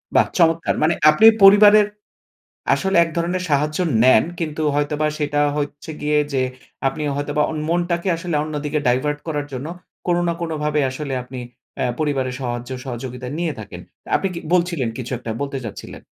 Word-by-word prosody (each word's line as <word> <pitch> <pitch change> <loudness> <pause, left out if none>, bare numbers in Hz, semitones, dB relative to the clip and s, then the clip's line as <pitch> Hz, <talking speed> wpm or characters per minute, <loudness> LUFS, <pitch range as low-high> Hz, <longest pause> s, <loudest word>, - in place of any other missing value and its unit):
বাহ, - - +5
চমৎকার! 165 -1 +2
মানে 160 +2 +3 0.2
আপনি 155 +9 +4 0.2
পরিবারের 205 +1 +8 0.9
আসলে 190 -1 -1
এক 165 - -6
ধরনের 175 +2 -1
সাহায্য 150 +2 +1 0.3
নেন 130 - +6 0.2
কিন্তু 155 -1 -3
হয়তোবা 145 +1 0
সেটা 145 0 0 0.2
হচ্ছে 145 +1 -4
গিয়ে 150 0 +2
যে, 130 -1 +1 0.5
আপনি 135 +3 -5
হয়তোবা 145 +1 0
অন 155 - -4
মনটাকে 175 +1 0
আসলে 170 -1 -4
অন্যদিকে 150 0 -3
ডাইভার্ট 145 +4 +1
করার 145 -2 -2
জন্য 130 +3 -5 0.4
কোনো 175 0 +2
না - - +2
কোনো 165 -2 -3
ভাবে 150 0 +1
আসলে 140 +1 -5
আপনি 125 +1 -9 0.4
অ্যা - - 0
পরিবারের 135 -4 -1
সাহায্য 120 -1 -4 0.2
সহযোগিতা 125 0 -6
নিয়ে 170 -3 -1
থাকেন। 105 - -9 0.4
আপনি 195 - -1
কি - - -4 0.2
বলছিলেন, 170 -8 +1
কিছু 125 +1 -5
একটা 120 -2 -7
বলতে 140 -1 -3
চাচ্ছিলেন। 100 -3 -8
150 Hz, 165 wpm, -21 LUFS, 135-170 Hz, 0.9 s, পরিবারের